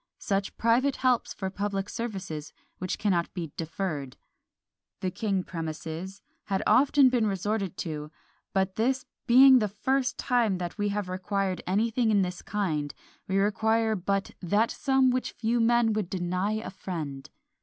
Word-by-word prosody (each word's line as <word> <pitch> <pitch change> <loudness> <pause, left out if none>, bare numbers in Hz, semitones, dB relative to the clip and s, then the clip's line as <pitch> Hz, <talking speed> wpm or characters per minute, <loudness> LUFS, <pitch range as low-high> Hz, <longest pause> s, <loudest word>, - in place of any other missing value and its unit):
Such 195 -1 -2
private 245 +5 +3
helps 255 -2 +1
for 190 -1 -4
public 200 0 -2
services 190 -11 -5 0.3
which 185 0 -2
cannot 180 -5 0
be 165 -5 -4
deferred," 160 -5 -4 0.8
the 185 - -1
king 195 -3 -1
premises, 165 +3 -6 0.2
had 195 -2 -1
been - - +5
often 275 -1 +5 0.2
resorted 195 -1 -2
to; 150 -2 -5 0.4
but 190 -1 0
this 255 +4 +1 0.2
"being 260 +1 +8
the 210 - +1
first 255 +6 0
time 235 -7 +1
that 175 -1 -4
we 205 0 +1
have 205 -1 -2
required 185 0 -2
anything 225 +5 +1
in 205 -3 +4
this 180 0 -4
kind, 155 -8 -2 0.3
we 190 - 0
require 220 +2 +2
but 195 +1 -1
that 205 +5 +2
sum 265 -2 +2
which 255 0 -2
few 235 +1 0
men 230 -1 +3
would 210 -4 -2
deny 185 +2 -1
a 220 +1 -4
friend." 155 -8 -6
200 Hz, 150 wpm, -28 LUFS, 180-230 Hz, 0.8 s, being